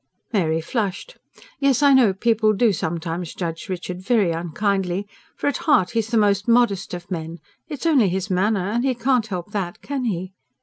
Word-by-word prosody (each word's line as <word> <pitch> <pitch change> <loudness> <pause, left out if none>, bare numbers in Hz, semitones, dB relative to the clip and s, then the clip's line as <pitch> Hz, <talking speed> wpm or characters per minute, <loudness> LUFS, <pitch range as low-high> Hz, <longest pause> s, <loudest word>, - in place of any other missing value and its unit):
Mary 165 -5 +1
flushed. 215 - -3 0.4
"Yes, 275 0 +2
I 280 -1 +6
know, 250 -6 +5
people 215 +2 +2
do 215 +1 +3
sometimes 165 0 -4
judge 165 -1 -5
Richard 180 0 -5
very 205 -3 +2
unkindly. 185 +3 -1 0.3
For - - -6
at 285 - +1
heart 190 -12 +4
he's 225 -2 0
the 230 0 0
most 205 -1 +2
modest 230 -7 +2
of 175 +2 -10
men. 165 -1 -4 0.3
It's 295 -1 -6
only 270 - +4
his 190 +2 -2
manner. 195 0 +1
And 240 +2 0
he 265 -2 +1
can't 245 -1 +1
help 185 -1 -5
that, 190 -4 -4
can 275 -3 -3
he?" 185 -3 -3
200 Hz, 180 wpm, -22 LUFS, 180-235 Hz, 0.4 s, I